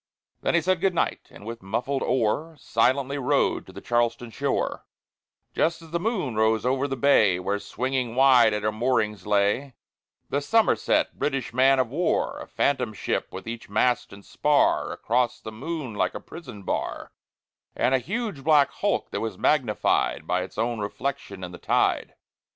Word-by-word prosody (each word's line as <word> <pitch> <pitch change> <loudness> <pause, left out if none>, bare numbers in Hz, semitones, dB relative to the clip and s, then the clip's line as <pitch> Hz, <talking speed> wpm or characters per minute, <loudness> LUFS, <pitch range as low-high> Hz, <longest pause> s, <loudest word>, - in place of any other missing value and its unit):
Then - - +1
he 170 - +4
said, 185 +1 +1
"Good 190 -2 +2
night!" - - -1
and 100 - -14
with 115 +1 -7
muffled 125 +8 -2
oar 130 +7 0
Silently 130 +3 +1
rowed 125 - +1
to - - -11
the - - -10
Charlestown 120 0 0
shore, - - -2 0.7
Just 165 +1 +1
as 160 - -14
the 170 - 0
moon 185 - -1
rose 110 +1 +2
over 130 +2 +1
the 135 - -2
bay, 110 -9 +4
Where 100 +3 -1
swinging 125 +1 -2
wide 130 -4 +6
at 105 0 -2
her 110 - +1
moorings 105 -4 0
lay 105 +6 +1 0.6
The 140 - +1
Somerset, 225 +10 +2
British 135 -4 -2
man 135 +2 +5
of 130 -3 +1
war; 165 +4 0
A - - -8
phantom 125 -5 0
ship, - - -2
with - - -8
each 115 -2 -6
mast 120 +4 +1
and 100 0 -13
spar 150 -1 +2
Across 120 +1 0
the 110 - -7
moon 135 +2 -5
like 105 - -1
a - - -3
prison 135 - -10
bar, - - -3 0.6
And 130 - +1
a 130 - +4
huge 200 - -4
black 150 -2 +4
hulk, - - -1
that - - -3
was 110 -4 -4
magnified 130 -8 +1
By - - 0
its - - -8
own 115 0 -1
reflection 105 -2 -4
in 90 - -6
the 90 - -10
tide. - - +1
125 Hz, 175 wpm, -25 LUFS, 110-140 Hz, 0.7 s, wide